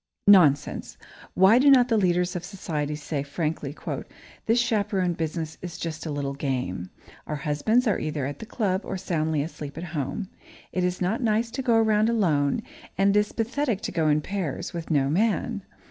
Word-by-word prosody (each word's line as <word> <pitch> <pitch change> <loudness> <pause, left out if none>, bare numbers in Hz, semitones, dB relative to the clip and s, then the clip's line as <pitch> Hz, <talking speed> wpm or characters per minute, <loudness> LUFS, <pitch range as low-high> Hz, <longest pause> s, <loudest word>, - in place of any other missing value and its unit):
Nonsense! 160 -9 +4 0.4
Why 190 +6 +6
do 280 +2 +6
not 255 -3 +6
the 230 - +2
leaders 180 -3 +1
of 175 - -3
society 160 -6 -3
say, 150 -1 -3
frankly: 150 0 -3 0.7
"This 225 +2 +4
chaperone 205 -6 +1
business 160 -1 -4
is 175 -1 -6
just 160 -1 -5
a - - -3
little 140 -1 -2
game. 125 -11 -3 0.4
Our 150 - -2
husbands 150 - +1
are 210 -5 +1
either 150 -3 -2
at 140 +1 -5
the 220 - -8
club 200 -5 0
or 190 - -4
soundly 160 -5 -1
asleep 150 -2 -7
at 165 - -5
home. 155 +7 -3 0.4
It 180 - -1
is 180 +1 -1
not 195 +7 0
nice 230 0 +1
to 260 +3 -3
go 240 -3 +2
around 220 -1 +3
alone, 180 -3 +1 0.3
and 195 +1 +3
it - - +6
is 210 - -1
pathetic 235 -1 -1
to - - -3
go 165 -3 +1
in 150 0 +3
pairs, 180 -5 -4
with 170 -2 -6
no 140 -4 +2
man. 210 +6 0
180 Hz, 185 wpm, -26 LUFS, 150-215 Hz, 0.7 s, Why